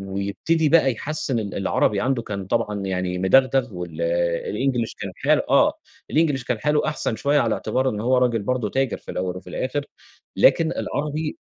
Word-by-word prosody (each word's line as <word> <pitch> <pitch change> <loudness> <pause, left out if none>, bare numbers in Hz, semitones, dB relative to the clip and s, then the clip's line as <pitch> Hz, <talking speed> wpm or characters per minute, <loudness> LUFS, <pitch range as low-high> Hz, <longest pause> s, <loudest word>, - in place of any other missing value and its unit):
ويبتدي 100 +12 -1
بقى 140 -5 +4
يحسّن 140 0 -2
ال 100 -3 -4
العربي 100 +1 +1
عنده 130 -2 0
كان 100 -4 -5
طبعًا 105 -1 -1
يعني 90 -1 -2
مدغدغ 130 +4 +3
وال 85 -2 -6 0.5
الإنجليش 120 0 -1
كان 100 -2 -6
حال - - +1
آه - - +4 0.4
الإنجليش 150 -5 +1
كان 125 -3 -1
حاله 150 0 +1
أحسن 150 -6 -1
شوية 145 +4 +2
على 115 -3 +1
اعتبار 130 +5 -1
إنّ 105 - -4
هو 125 +3 +2
راجل 120 -4 +1
برضو 125 -1 -1
تاجر 135 +1 0
في - - -10
الأوّل 90 0 -3
وفي - - -12
الآخر، 140 +2 -3 0.5
لكن 165 -1 +4
العربي 150 +2 -3
120 Hz, 170 wpm, -23 LUFS, 100-135 Hz, 0.5 s, بقى